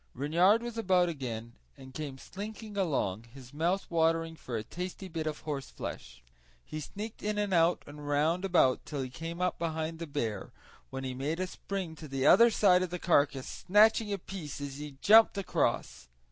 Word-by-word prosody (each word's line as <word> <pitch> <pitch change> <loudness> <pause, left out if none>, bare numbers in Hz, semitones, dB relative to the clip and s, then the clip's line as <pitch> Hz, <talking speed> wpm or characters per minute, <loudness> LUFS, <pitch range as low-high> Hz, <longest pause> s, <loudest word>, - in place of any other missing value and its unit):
Reynard 175 - +3
was 235 -1 -5
about 185 -4 +3
again 120 -6 -5 0.2
and 130 0 -12
came 140 -2 -5
slinking 210 - -8
along, 130 - -1
his 130 -1 -12
mouth 175 +6 0
watering 165 0 +1
for 125 -6 -5
a 110 - -3
tasty 180 - -6
bit 160 -3 -4
of 150 -1 -2
the - - -18
horseflesh. 135 - -6 0.4
He 155 - -6
sneaked 210 +8 -7
in 210 0 -2
and 205 -2 0
out 170 0 +3
and 145 0 -10
round 155 +5 +1
about 175 -9 +3
till 145 -3 -4
he 130 - -6
came 165 +5 -6
up 180 - 0
behind 160 -1 -3
the 165 - -5
bear, 115 -9 -3 0.4
when 135 0 -5
he 130 -1 -3
made 145 +6 -3
a 185 - 0
spring 185 -2 -5
to 155 - -9
the 135 -1 -2
other 235 +1 +8
side 185 -5 +4
of 185 - -1
the 180 - -4
carcass, 145 -6 +2 0.2
snatching 210 +2 +5
a 200 - 0
piece 175 -7 -7
as 140 -1 -6
he 145 -2 -8
jumped 220 0 +7
across. 185 - -1
165 Hz, 190 wpm, -30 LUFS, 140-190 Hz, 0.4 s, other